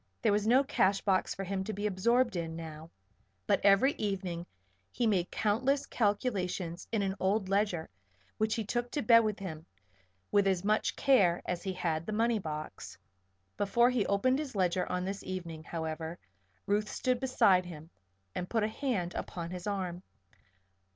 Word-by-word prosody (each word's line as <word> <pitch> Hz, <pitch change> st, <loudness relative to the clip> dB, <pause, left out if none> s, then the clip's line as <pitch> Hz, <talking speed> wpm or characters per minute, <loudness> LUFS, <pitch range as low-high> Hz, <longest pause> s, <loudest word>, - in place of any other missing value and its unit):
There -, -, +4 dB
was 205 Hz, +1 st, +1 dB
no 255 Hz, +4 st, +5 dB
cash 195 Hz, -7 st, +2 dB
box 190 Hz, -2 st, +1 dB
for 195 Hz, -, -4 dB
him 190 Hz, 0 st, -2 dB
to 215 Hz, -, -4 dB
be 205 Hz, +2 st, -4 dB
absorbed 235 Hz, +4 st, +2 dB
in 165 Hz, -2 st, -3 dB
now; 160 Hz, -1 st, -8 dB, 0.6 s
but -, -, +2 dB
every 200 Hz, +7 st, +5 dB
evening 185 Hz, -4 st, -3 dB, 0.4 s
he 245 Hz, -, -1 dB
made 190 Hz, -5 st, +2 dB
countless 255 Hz, +7 st, +1 dB
calculations 195 Hz, -6 st, -1 dB
in 220 Hz, -3 st, +1 dB
an 190 Hz, -1 st, 0 dB
old 195 Hz, 0 st, +1 dB
ledger 195 Hz, -5 st, +1 dB, 0.5 s
which 220 Hz, 0 st, +1 dB
he 225 Hz, -, -2 dB
took 240 Hz, +3 st, -2 dB
to 290 Hz, -, -1 dB
bed 230 Hz, +1 st, +7 dB
with 215 Hz, -2 st, 0 dB
him 160 Hz, -6 st, -6 dB, 0.7 s
with 200 Hz, -1 st, +4 dB
as 190 Hz, -2 st, +1 dB
much 215 Hz, +2 st, +1 dB
care 195 Hz, -11 st, +3 dB
as 175 Hz, -1 st, -2 dB
he 190 Hz, -, -3 dB
had 165 Hz, -2 st, -2 dB
the 215 Hz, -, -2 dB
money 225 Hz, +1 st, +2 dB
box. 155 Hz, -, -6 dB, 0.6 s
Before 235 Hz, +5 st, +3 dB
he 245 Hz, -4 st, +1 dB
opened 255 Hz, +7 st, +2 dB
his 290 Hz, -6 st, -5 dB
ledger 180 Hz, -1 st, +1 dB
on 180 Hz, 0 st, -1 dB
this 195 Hz, +1 st, -4 dB
evening, 170 Hz, -4 st, -6 dB
however, 160 Hz, 0 st, -4 dB, 0.5 s
Ruth 210 Hz, +1 st, +1 dB
stood 255 Hz, -1 st, 0 dB
beside 195 Hz, -8 st, +3 dB
him 160 Hz, -1 st, -10 dB, 0.4 s
and 180 Hz, -, -4 dB
put 225 Hz, -2 st, +1 dB
a -, -, +2 dB
hand 215 Hz, -7 st, -2 dB
upon 170 Hz, -1 st, -5 dB
his 180 Hz, +1 st, -6 dB
arm. 185 Hz, -3 st, -3 dB
195 Hz, 170 wpm, -31 LUFS, 175-220 Hz, 0.7 s, bed